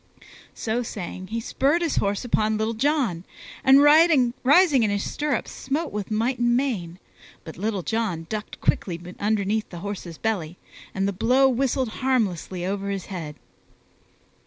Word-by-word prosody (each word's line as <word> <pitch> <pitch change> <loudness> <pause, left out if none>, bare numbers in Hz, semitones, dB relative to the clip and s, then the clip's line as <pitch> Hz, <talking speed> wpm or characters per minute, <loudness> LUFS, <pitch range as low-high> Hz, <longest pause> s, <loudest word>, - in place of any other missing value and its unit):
So 230 +2 -1
saying, 185 -4 -6
he 230 +3 -3
spurred 285 +8 +1
his 330 - -1
horse 200 +3 0
upon 215 -2 +1
Little 220 +1 -1
John, 240 - 0 0.4
and 270 +1 +7
rising 290 0 +5
in 220 - +2
his 205 0 -1
stirrups 295 -5 -2
smote 295 +5 -3
with 205 -2 -4
might 230 +4 0
and 240 0 +3
main, 195 -11 -2 0.5
but 160 - -9
Little 200 -1 -2
John 215 -7 -2
ducked 215 +2 -6
quickly 170 -3 0 0.2
underneath 210 +1 0
the 175 -2 -8
horse's 185 -5 -6
belly 180 -7 -2 0.4
and 195 0 0
the 200 - -1
blow 250 +7 +3
whistled 260 -1 0
harmlessly 195 -8 -1
over 200 +1 -2
his 195 -2 -3
head. 155 -5 -6
220 Hz, 150 wpm, -24 LUFS, 195-260 Hz, 0.5 s, and